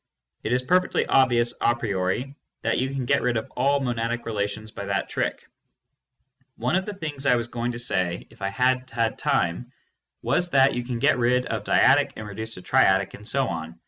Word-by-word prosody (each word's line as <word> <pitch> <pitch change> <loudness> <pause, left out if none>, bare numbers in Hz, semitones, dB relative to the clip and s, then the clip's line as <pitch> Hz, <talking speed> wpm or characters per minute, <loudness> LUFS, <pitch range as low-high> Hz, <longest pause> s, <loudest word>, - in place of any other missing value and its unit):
It 110 - -3
is 125 +1 +1
perfectly 180 +6 +2
obvious 120 -3 +3
a 120 - +3
priori 110 +4 -2 0.3
that 115 - +1
you 130 +1 0
can 135 -2 -3
get 140 +3 +2
rid 125 -2 +1
of 110 - -5
all 140 +3 +2
monadic 120 -2 -2
relations 110 0 -3
by 100 -2 -7
that 100 -1 -1
trick. - - -3 1.1
One - - -1
of 190 +2 0
the 210 - -5
things 145 -6 -5
I 125 - +5
was 120 -1 -1
going 120 0 -3
to - - -5
say 90 -7 -1
if - - -20
I 95 - 0
had 125 +4 +1
had 115 -2 -1
time 90 +9 0 0.5
was 180 0 +1
that 135 -3 +4
you 125 - -2
can 120 -1 -4
get 115 - +3
rid 125 +1 +2
of - - -3
dyadic - - +4
and 110 - -7
reduce 110 +2 -6
to 90 - -10
triadic, 95 +1 +3
and 105 - -11
so 135 +1 +1
on. 80 -1 -6
120 Hz, 205 wpm, -25 LUFS, 105-130 Hz, 1.1 s, I